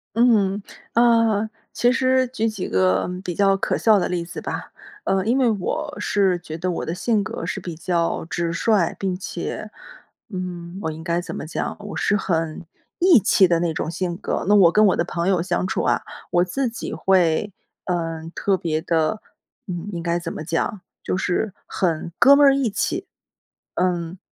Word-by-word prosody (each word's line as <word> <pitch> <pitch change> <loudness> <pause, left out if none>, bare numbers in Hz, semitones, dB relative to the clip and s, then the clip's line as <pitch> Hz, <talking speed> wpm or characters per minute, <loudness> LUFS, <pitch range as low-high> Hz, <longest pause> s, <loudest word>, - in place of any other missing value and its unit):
嗯， 210 -4 +3 0.3
呃， 230 -2 +3 0.2
其 245 - +2
实 260 0 +2
举 235 -3 -1
几 215 -4 -4
个 95 - +2
比 180 - -3
较 195 +2 +3
可 195 - -1
笑 220 -2 +5
的 185 - 0
例 175 -2 -2
子 170 - -7
吧。 - - -5 0.3
呃， 190 0 +1
因 235 +4 +2
为 255 -3 +3
我 295 +9 -2
是 195 -3 +2
觉 160 -2 -7
得 180 +2 -2
我 175 - -2
的 165 - -3
性 210 +3 +1
格 - - -5
是 205 - -3
比 175 -2 -6
较 170 0 -1
直 170 -1 -1
率， 175 +1 +2
并 190 -2 -1
且， 190 +3 -5 0.6
嗯， 180 -2 -6
我 160 - -2
应 155 +1 -8
该 170 0 0
怎 - - -7
么 - - -5
讲， 160 - -3
我 205 0 -7
是 205 - +2
很 165 -4 -2 0.3
义 350 -6 +7
气 190 -1 +4
的 170 -1 +2
那 170 -2 0
种 155 - -3
性 175 0 -3
格， - - -3
那 - - +6
我 190 -5 +7
跟 215 +4 +5
我 190 - +3
的 170 - +1
朋 170 +1 -1
友 185 -3 +2
相 180 +1 -1
处 185 - -1
啊， - - +2 0.3
我 175 - +4
自 245 +8 -1
己 230 - -6
会， 185 +1 +2 0.3
呃， 165 -2 -3
特 195 -1 +1
别 160 -3 -1
的， 170 +6 0 0.5
嗯， 175 0 -5
应 170 -1 -4
该 170 0 0
怎 170 -1 -5
么 - - -6
讲， 175 +6 -2 0.2
就 - - -2
是 190 +2 -1
很 170 -2 -1
哥 275 - +8
儿 - - +8
们 280 -1 +5
义 255 -4 +1
气。 365 - -2 0.7
嗯， 175 -1 -1
185 Hz, 205 characters per minute, -22 LUFS, 170-215 Hz, 0.7 s, 哥